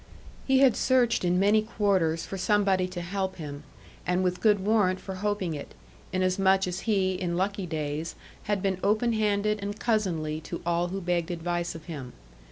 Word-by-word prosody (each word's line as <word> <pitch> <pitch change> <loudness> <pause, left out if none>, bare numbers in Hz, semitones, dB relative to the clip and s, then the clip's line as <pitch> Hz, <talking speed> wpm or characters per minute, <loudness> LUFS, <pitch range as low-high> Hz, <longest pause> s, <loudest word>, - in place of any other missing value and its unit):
He 265 -1 +4
had 260 -5 +6
searched 250 -5 +2
in 180 0 +2
many 205 +2 +4
quarters 190 -7 +1
for - - -6
somebody 195 -2 +2
to 180 -1 -6
help 190 +2 -3
him, 145 -3 -7 0.4
and 180 +1 +1
with 180 0 -1
good 210 -2 +4
warrant 195 -3 +2
for 190 - -6
hoping 195 -3 -1
it, 145 - -8 0.4
inasmuch 190 +1 +2
as 180 +1 -3
he, 190 -3 +2
in 180 -2 -2
lucky 195 0 -1
days, 155 0 -3 0.3
had 205 -2 -1
been 190 -2 0
open 215 +4 +2
handed 210 -1 +1
and 205 +1 -4
cousinly 165 -9 0
to 170 - -5
all 170 0 +1
who 195 +2 -4
begged 175 -1 0
advice 175 0 -2
of 165 - -10
him. 145 -7 -7
185 Hz, 175 wpm, -27 LUFS, 175-205 Hz, 0.4 s, had